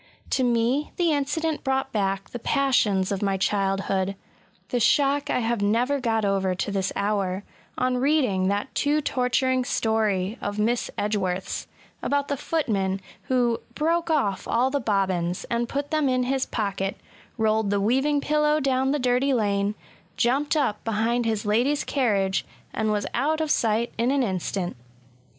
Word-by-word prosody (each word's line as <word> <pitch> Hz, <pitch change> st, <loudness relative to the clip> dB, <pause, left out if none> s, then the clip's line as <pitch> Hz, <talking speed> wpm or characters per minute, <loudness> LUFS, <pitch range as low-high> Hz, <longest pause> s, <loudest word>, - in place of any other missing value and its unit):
To 260 Hz, -, +2 dB
me 245 Hz, +4 st, +1 dB
the 345 Hz, -2 st, +2 dB
incident 300 Hz, +2 st, -1 dB
brought 270 Hz, -1 st, 0 dB
back 195 Hz, -3 st, -1 dB
the 240 Hz, -, -5 dB
passions 225 Hz, -9 st, +2 dB
of 195 Hz, -, -2 dB
my 195 Hz, -1 st, +1 dB
childhood—the 195 Hz, +1 st, -2 dB
shock 280 Hz, +4 st, +3 dB
I -, -, +1 dB
have 230 Hz, -1 st, 0 dB
never 240 Hz, +7 st, +2 dB
got 225 Hz, -4 st, 0 dB
over 195 Hz, -2 st, +1 dB
to 195 Hz, -, -2 dB
this 195 Hz, -1 st, -1 dB
hour— 200 Hz, -2 st, -1 dB, 0.3 s
on 255 Hz, 0 st, +1 dB
reading 255 Hz, -10 st, +2 dB
that 205 Hz, +6 st, -1 dB
too 295 Hz, +1 st, +1 dB
torturing 255 Hz, -1 st, +1 dB
story 220 Hz, -3 st, 0 dB
of 205 Hz, 0 st, -3 dB
Miss 230 Hz, +3 st, 0 dB
Edgeworth's, 190 Hz, -3 st, -2 dB, 0.3 s
about 285 Hz, 0 st, 0 dB
the 285 Hz, -, +1 dB
footman, 200 Hz, -12 st, -1 dB, 0.3 s
who 245 Hz, -3 st, +2 dB
'* -, -, -30 dB
broke 335 Hz, +2 st, 0 dB
off 260 Hz, -12 st, 0 dB
all 250 Hz, +3 st, +2 dB
the 285 Hz, -, +1 dB
bobbins, 190 Hz, -6 st, 0 dB
and 235 Hz, 0 st, 0 dB
put 285 Hz, +1 st, -3 dB
them 305 Hz, -3 st, +2 dB
ia 255 Hz, 0 st, +2 dB
his 265 Hz, +1 st, 0 dB
pocket, 195 Hz, -3 st, -2 dB, 0.4 s
rolled 220 Hz, -2 st, +1 dB
the 205 Hz, 0 st, +1 dB
weaving 270 Hz, +8 st, +2 dB
pillow 300 Hz, 0 st, +2 dB
down 265 Hz, -2 st, +1 dB
the 290 Hz, -, +2 dB
dirty 255 Hz, +1 st, +2 dB
lane, 205 Hz, -2 st, 0 dB, 0.4 s
jumped 280 Hz, +6 st, +2 dB
up 250 Hz, -8 st, 0 dB
behind 230 Hz, +2 st, 0 dB
his 220 Hz, -2 st, 0 dB
lady'^s 245 Hz, +8 st, +1 dB
carriage, 200 Hz, -8 st, +1 dB, 0.3 s
and 220 Hz, -1 st, 0 dB
was 205 Hz, -1 st, 0 dB
out 305 Hz, +6 st, +1 dB
of 315 Hz, -2 st, 0 dB
sight 230 Hz, -1 st, +1 dB
in 235 Hz, +2 st, +2 dB
an 275 Hz, -1 st, +2 dB
instant." 185 Hz, -3 st, -2 dB
235 Hz, 160 wpm, -25 LUFS, 200-275 Hz, 0.4 s, shock